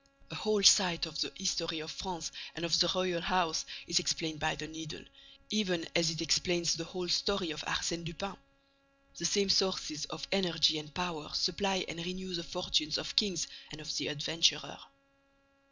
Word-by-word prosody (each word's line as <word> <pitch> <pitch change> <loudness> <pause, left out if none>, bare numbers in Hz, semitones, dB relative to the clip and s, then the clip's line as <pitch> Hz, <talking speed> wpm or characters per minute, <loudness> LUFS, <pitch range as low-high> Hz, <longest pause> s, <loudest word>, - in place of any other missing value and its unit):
A - - -5
whole 215 -2 0
side 180 -4 +7
of 155 -3 -5
the - - -1
history 170 -4 -1
of 155 +1 -6
France 175 -6 -5 0.2
and 165 +1 -3
of 170 0 +3
the 175 -1 +5
royal 185 -2 0
house 180 -3 +1 0.2
is 170 +1 +3
explained 160 -3 -1
by 155 +1 0
the 150 - -6
Needle, 160 +1 -8 0.5
even 185 -6 0
as 170 -1 +4
it 165 0 -2
explains 165 +1 +2
the 165 - -3
whole 180 0 -5
story 185 0 +1
of 150 -2 -5
Arsène 170 -1 -1
Lupin. 185 +3 -6 0.8
The 170 - -2
same 200 +2 +2
sources 175 -5 +1
of 155 - -7
energy 165 -5 +3
and 150 0 -10
power 165 -2 -4
supply 190 +1 +1
and 170 +1 -5
renew 185 +1 -5
the 170 -1 -2
fortunes 160 -4 0
of 285 - -4
kings 195 - +2 0.3
and 150 - -9
of 155 0 -5
the - - -1
adventurer." 150 0 +1
170 Hz, 175 wpm, -32 LUFS, 155-185 Hz, 0.8 s, side